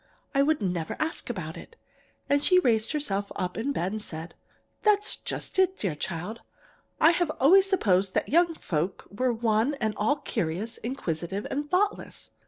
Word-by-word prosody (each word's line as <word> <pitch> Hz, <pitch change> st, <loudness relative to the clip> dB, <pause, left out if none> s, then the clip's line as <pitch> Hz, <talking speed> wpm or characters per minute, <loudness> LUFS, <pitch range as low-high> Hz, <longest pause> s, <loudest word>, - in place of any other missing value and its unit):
I 275 Hz, -, +4 dB
would 295 Hz, -4 st, +2 dB
never 175 Hz, -4 st, -2 dB
ask 315 Hz, -4 st, -3 dB
about 170 Hz, -9 st, -4 dB
it. 465 Hz, -, -12 dB, 0.5 s
And 285 Hz, 0 st, +2 dB
she 365 Hz, -, +5 dB
raised 225 Hz, -10 st, +3 dB
herself 205 Hz, -10 st, -2 dB
up 180 Hz, 0 st, -3 dB
in 245 Hz, +6 st, -1 dB
bed, 185 Hz, -8 st, -1 dB
and 215 Hz, 0 st, -4 dB
said: 160 Hz, -3 st, -7 dB, 0.5 s
"'That's 420 Hz, 0 st, +3 dB
just -, -, -4 dB
it, 375 Hz, 0 st, +3 dB
dear 190 Hz, -6 st, -1 dB
child. 175 Hz, +8 st, -5 dB, 0.6 s
I 325 Hz, -, +7 dB
have 345 Hz, 0 st, +1 dB
always 380 Hz, +8 st, +6 dB
supposed 195 Hz, -, +2 dB
that -, -, +1 dB
young 335 Hz, +2 st, +3 dB
folks 170 Hz, -, -3 dB
were 250 Hz, +5 st, +1 dB
one 225 Hz, +3 st, +1 dB
and 220 Hz, -6 st, -1 dB
all 220 Hz, +8 st, +2 dB
curious, 220 Hz, -, -3 dB
inquisitive, 195 Hz, -, -3 dB
and 290 Hz, +1 st, -2 dB
thoughtless. 405 Hz, +5 st, -1 dB
230 Hz, 170 wpm, -27 LUFS, 190-310 Hz, 0.6 s, I